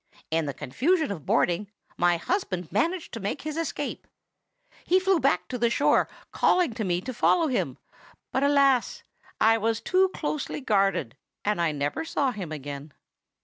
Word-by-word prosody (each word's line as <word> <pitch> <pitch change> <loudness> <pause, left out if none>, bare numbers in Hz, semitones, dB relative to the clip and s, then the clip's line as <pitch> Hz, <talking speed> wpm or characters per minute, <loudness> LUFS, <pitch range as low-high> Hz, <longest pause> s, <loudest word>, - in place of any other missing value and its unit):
"In 160 -1 +1
the 140 - -2
confusion 290 - 0
of 160 -8 -7
boarding, 180 +4 +1 0.3
my 175 -1 +3
husband 185 - -2
managed 330 - -1
to 230 - -4
make 200 0 -3
his 305 0 -4
escape. 330 -1 -4 0.8
He 370 +2 +3
flew 375 -2 +2
back 275 - +1
to 250 - -4
the 235 0 +3
shore, - - +3 0.2
calling 350 -9 +2
to 220 -1 -3
me 175 -2 0
to 255 +5 -5
follow 330 +8 +3
him; 250 - -1 0.5
but, 265 - 0
alas! 275 -3 +3 0.4
I 225 +1 +4
was 225 +1 0
too 375 +1 +2
closely 300 -5 -3
guarded, 195 - +1 0.3
and 210 -4 +1
I 165 -2 +2
never 145 - -2
saw 285 -4 0
him 190 -9 -6
again. 145 0 -7
225 Hz, 165 wpm, -26 LUFS, -, 0.8 s, I